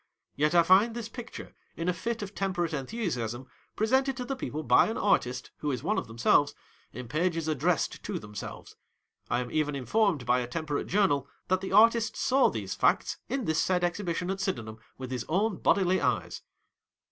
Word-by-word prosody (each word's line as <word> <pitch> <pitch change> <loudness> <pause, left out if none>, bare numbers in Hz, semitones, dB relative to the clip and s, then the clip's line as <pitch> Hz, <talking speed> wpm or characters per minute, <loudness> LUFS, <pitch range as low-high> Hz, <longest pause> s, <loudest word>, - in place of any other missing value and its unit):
Yet 150 +4 +1
I 170 - +7
find 200 +7 +4
this 235 -2 -4
picture, 240 0 -9 0.2
in 165 - -3
a 180 - +2
fit 225 +6 -3
of 200 0 -7
temperate 180 -4 -1
enthu 160 - -4
siasm, 120 - -3 0.3
presented 265 +4 +1
to 250 - -4
the 270 - -3
people 155 - -4
by 125 -3 +5
an 220 - -3
artist 125 -10 0
who 150 - -3
is 125 -4 -4
one - - +1
of - - -7
themselves, 120 +5 +2 0.4
in 125 -1 -8
pages 165 +4 -1
addressed 155 +2 0
to - - -4
themselves. 105 -1 -8 0.5
I 120 - +1
am 120 -1 -6
even 150 -2 0
informed 160 - +1
by 125 +1 +3
a 120 - -3
temperate 150 +1 -3
journal, 175 -9 +2 0.2
that 185 0 +2
the 195 - -5
artist 225 +2 +4
saw 270 0 +3
these - - -4
facts, - - +1
in 265 -4 -2
this 160 0 +1
said 180 +1 +1
Exhibition 175 0 -1
at 195 - -4
Syden 120 - -2
ham, 110 0 -9 0.2
with 130 -1 -7
his 125 -2 -2
own 195 +3 +1
bodily 185 -1 +2
eyes. - - -1
170 Hz, 195 wpm, -29 LUFS, 135-210 Hz, 0.5 s, I